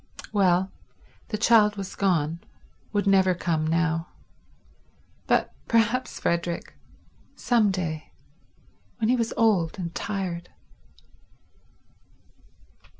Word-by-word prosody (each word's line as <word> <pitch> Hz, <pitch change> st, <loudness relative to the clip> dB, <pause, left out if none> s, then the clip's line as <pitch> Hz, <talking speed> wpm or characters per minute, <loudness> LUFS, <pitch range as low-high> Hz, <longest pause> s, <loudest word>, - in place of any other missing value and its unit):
Well, 190 Hz, -2 st, +3 dB, 0.6 s
the 215 Hz, -, -3 dB
child 215 Hz, -1 st, +5 dB
was 195 Hz, -2 st, -6 dB
gone, 170 Hz, -4 st, +1 dB, 0.5 s
would 205 Hz, -1 st, 0 dB
never 190 Hz, -2 st, +4 dB
come 160 Hz, -3 st, -1 dB
now; 165 Hz, +1 st, 0 dB, 1.2 s
but -, -, +2 dB
perhaps 230 Hz, +3 st, +1 dB
Frederick—some 175 Hz, +6 st, -2 dB
day—when 160 Hz, -, -6 dB
he 250 Hz, -, +4 dB
was 230 Hz, -2 st, -1 dB
old 200 Hz, -7 st, +2 dB
and 170 Hz, -3 st, -5 dB
tired 180 Hz, -4 st, -4 dB
190 Hz, 85 wpm, -26 LUFS, 170-210 Hz, 1.2 s, child